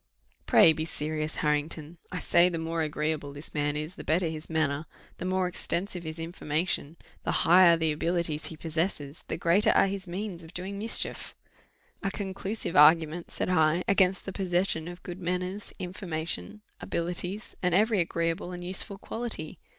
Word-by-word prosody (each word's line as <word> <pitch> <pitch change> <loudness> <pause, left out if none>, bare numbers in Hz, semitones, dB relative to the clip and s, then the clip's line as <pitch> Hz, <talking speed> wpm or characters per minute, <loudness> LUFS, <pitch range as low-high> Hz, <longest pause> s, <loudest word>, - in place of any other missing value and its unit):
"Pray 160 - +7
be 155 0 -3
serious, 155 -1 -2
Harrington 150 +2 -1
I 180 - -3
say 175 +1 +5
the 170 - -3
more 165 0 -2
agreeable 150 -1 -2
this 145 +2 -8
man 145 0 0
is, 155 +4 -5
the - - -7
better 165 +3 +1
his 155 -1 -6
manner, 155 -1 0 0.3
the - - -4
more 185 0 +1
extensive 180 +1 -2
his 160 -1 -6
information, 165 -1 -2 0.3
the - - 0
higher 175 0 +7
the 160 -1 +1
abilities 165 0 -1
he 160 - -8
possesses, 160 -2 -2
the - - -2
greater 175 +5 +3
are - - +5
his 195 -1 -4
means 185 0 -5
of 160 0 -14
doing 195 +3 -4
mischief." 225 +2 +1 0.7
"A 195 - 0
conclusive 195 0 -3
argument," 160 +2 +5
said. - - -3
I, 165 0 +3
"against 190 -1 +3
the 195 - -5
possession 180 -3 0
of 175 +1 -9
good 175 +1 -7
manners, 180 +3 -2
information, 180 +3 -4 0.2
abilities, 180 +5 -3
and 180 -2 +2
every 215 +1 +3
agreeable 170 +1 -1
and 175 0 -6
useful 190 +3 -4
quality! 235 +4 -4
170 Hz, 165 wpm, -28 LUFS, 160-185 Hz, 0.7 s, Pray